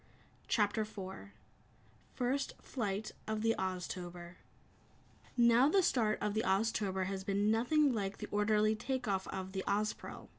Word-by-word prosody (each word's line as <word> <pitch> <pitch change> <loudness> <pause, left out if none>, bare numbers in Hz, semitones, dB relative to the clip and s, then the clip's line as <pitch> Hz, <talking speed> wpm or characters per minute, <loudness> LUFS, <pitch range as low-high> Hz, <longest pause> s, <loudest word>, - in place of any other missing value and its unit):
CHAPTER 210 0 +2
4 200 -1 -8 0.8
First 265 +2 0
Flight 215 -4 -3 0.2
of 220 0 -2
the 225 0 +4
Oztober 180 -1 -4 1.0
Now 240 +3 +6
the 385 +3 +4
start 220 -8 +2
of 210 -1 0
the 215 - +1
Oztober 195 -3 +1
had 190 0 -3
been 200 +2 +1
nothing 265 +5 +3
like 200 -3 -2
the - - -6
orderly 210 +1 +3
take 255 +2 -3
off 190 -2 0
of 190 0 -5
the 190 -1 -3
Ozpril. 210 +2 -2
210 Hz, 140 wpm, -34 LUFS, 190-230 Hz, 1.0 s, Now